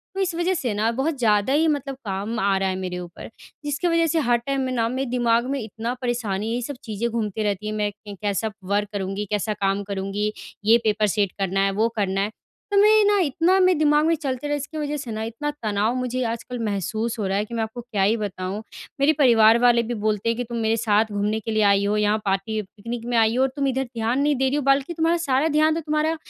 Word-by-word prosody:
तो - - -3
इस 370 -2 0
वजह 350 +2 +1
से 255 - -2
ना 215 +2 +1
बहुत 275 +5 -1
ज़्यादा 215 +2 +2
ही 320 +2 +3
मतलब 280 -3 -1
काम 205 +3 -3
आ 195 -1 +2
रहा 190 0 0
है 185 - -2
मेरे 185 -1 -4
ऊपर। 175 -1 -9 0.4
जिसकी 295 +4 -1
वजह 335 -1 +3
से 325 +1 +1
हर 240 -5 +2
टाइम 270 +3 -2
में 260 -1 -2
ना 230 -2 +1
मेरे 260 +1 -2
दिमाग 240 -1 +2
में 280 - -1
इतना 225 +2 -4
परेशानी 225 -4 -2
है 235 - -1
ये 245 - -2
सब 285 +4 -5
चीज़ें 225 0 -2
घूमती 220 -2 -2
रहती 205 0 -2
है 215 - -2
मैं 210 -1 0 0.2
कैसा 205 +2 -2 0.2
वर्क 205 0 +1
करूँगी 195 +1 -3
कैसा 210 +1 0
काम 195 0 -1
करूँगी 200 +1 -2 0.3
ये 225 +2 +6
पेपर 215 0 +2
सेट 200 -3 +2
करना 195 0 0
है 195 - +1
वो 225 - +4
करना 195 -1 0
है। 205 +2 -1 0.4
तो 405 - +2
मैं 430 +1 +6
ना 410 0 +4
इतना 335 +6 +2
मेरे 365 -3 +4
दिमाग 300 0 +4
में 330 - +3
चलते 280 -2 -4
रहे 290 - 0
इसकी 290 +2 -7
वजह 295 0 -2
से 250 -5 -6
ना 220 0 -3
इतना 230 +7 -4
तनाव 215 +3 0
मुझे 255 0 -2
आजकल 235 +2 -6
महसूस 215 +3 -2
हो 205 - -1
रहा 195 - 0
है 205 - 0
कि 235 - -11
मैं 225 -1 0
आपको 220 +2 -6
क्या 230 -4 -3
ही 215 +4 +3
बताऊँ। 200 -1 -4 0.4
मेरे 285 +3 +4
परिवार 230 -4 +6
वाले 240 -1 +4
भी 240 - -4
बोलते 215 +1 0
हैं 230 - +1
कि 245 - -1
तुम 235 0 -6
मेरे 225 0 +1
साथ 215 -1 +2
घूमने 205 +2 -1
के 220 +1 -5
लिए 215 -1 +2
आई 200 0 +2
हो 210 +1 +1
यहाँ 210 0 +2
पार्टी 195 +3 -1
पिकनिक 230 +4 -7
में 240 -1 0
आई 225 0 +3
हो 255 - +2
और 265 - +3
तुम 280 -1 0
इधर 265 0 0
ध्यान 230 +4 0
नहीं 290 0 +2
दे 265 0 +1
रही 280 - -1
हो 295 - 0
बल्कि 275 +4 +2
तुम्हारा 330 +1 +1
सारा 270 +3 +2
ध्यान 310 +1 +4
तो 330 - -2
तुम्हारा 305 +1 0
230 Hz, 255 wpm, -23 LUFS, 210-275 Hz, 0.4 s, ये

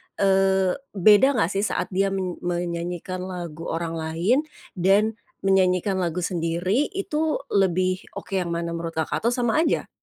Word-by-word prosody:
eee, 190 -1 +3 0.2
beda 215 +8 +6
nggak 190 -6 +1
sih 200 +2 0
saat - - -2
dia 195 +1 +2
men 190 -2 -3
menyanyikan 175 +1 -3
lagu 170 -3 -6
orang 165 0 -3
lain 165 +9 +1 0.3
dan 205 +4 +2 0.2
menyanyikan 190 0 +2
lagu 180 -1 -1
sendiri, 175 - 0
itu 320 -5 -1
lebih 185 -1 +2 0.2
oke 195 - -4
yang 175 -2 -1
mana 170 0 -3
menurut 165 0 -5
Kakak? 160 +7 -2
Atau 235 - +3
sama 245 +1 +1
aja? - - 0
185 Hz, 150 wpm, -24 LUFS, 170-200 Hz, 0.3 s, beda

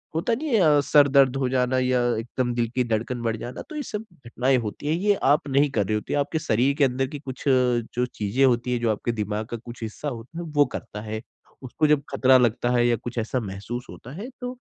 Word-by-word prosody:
होता 170 +8 0
नहीं 300 +7 -2
है, 155 -8 +5
सर 145 0 +5
दर्द 135 -2 +4
हो 135 -1 0
जाना 130 0 +1
या 130 0 +2 0.2
एकदम 120 +2 -2
दिल 120 -1 +1
की 125 - +2
धड़कन 115 +2 -1
बढ़ 115 -1 0
जाना, 120 +3 -7
तो 310 - -11
ये 300 - -2
सब 215 -3 -5 0.2
घटनाएँ 125 +3 +1
होती 115 +5 -5
हैं। 155 - +2
ये 205 0 +3
आप 145 +4 +3
नहीं 140 +2 +3
कर 105 -6 +1
रहे 110 - 0
होते 105 - -3
आपके 155 +3 -2
शरीर 130 -2 +2
के 150 - +3
अंदर 130 +1 0
की 145 +2 -7
कुछ 135 -2 -8
जो 125 -2 +2
चीज़ें 110 +6 +1
होती 125 -1 +1
हैं 120 - 0
जो 115 - +1
आपके 110 +3 -2
दिमाग 105 -1 -3
का 120 - -3
कुछ 120 +1 -11
हिस्सा 110 +7 -5
होता 120 +5 -9
है 175 - -5
वो 145 - +7
करता 105 -3 -7
है। 110 0 -5 0.4
उसको 140 +5 0
जब 150 -1 +3
खतरा 130 -1 +5
लगता 120 -1 +1
है 120 0 +3
या 120 - +3
कुछ 120 +1 -8
ऐसा 115 +3 -1
महसूस 105 +4 -6
होता 125 - -11
है 210 +8 -6
तो, 250 +1 -5
125 Hz, 240 wpm, -24 LUFS, 115-140 Hz, 0.4 s, वो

